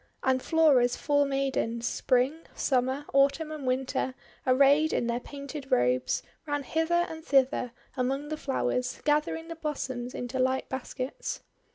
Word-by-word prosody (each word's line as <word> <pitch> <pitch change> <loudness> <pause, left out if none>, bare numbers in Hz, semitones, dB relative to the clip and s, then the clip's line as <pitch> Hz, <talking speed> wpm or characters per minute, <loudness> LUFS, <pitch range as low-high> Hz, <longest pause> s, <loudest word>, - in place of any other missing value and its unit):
And 260 0 +2
Flora's 275 -7 +4
four 285 -1 +2
maidens, 270 -4 -1
Spring, 265 +8 +1
Summer, 260 +2 0
Autumn, 280 +3 +3
and 295 -4 -5
Winter, 255 0 -1 0.3
arrayed 280 +4 +5
in - - +1
their 235 0 0
painted 280 +1 -8
robes, 125 +1 +2 0.2
ran 290 -1 -1
hither 325 +5 +1
and 320 0 -8
thither 265 -4 +2 0.2
among 270 +3 -1
the 310 - -2
flowers, 255 -3 -1
gathering 305 +2 +1
the 335 - -6
blossoms 260 -6 -4
into 245 +1 -4
light 260 +1 +1
baskets. 265 - -4
270 Hz, 140 wpm, -28 LUFS, 255-300 Hz, 0.3 s, arrayed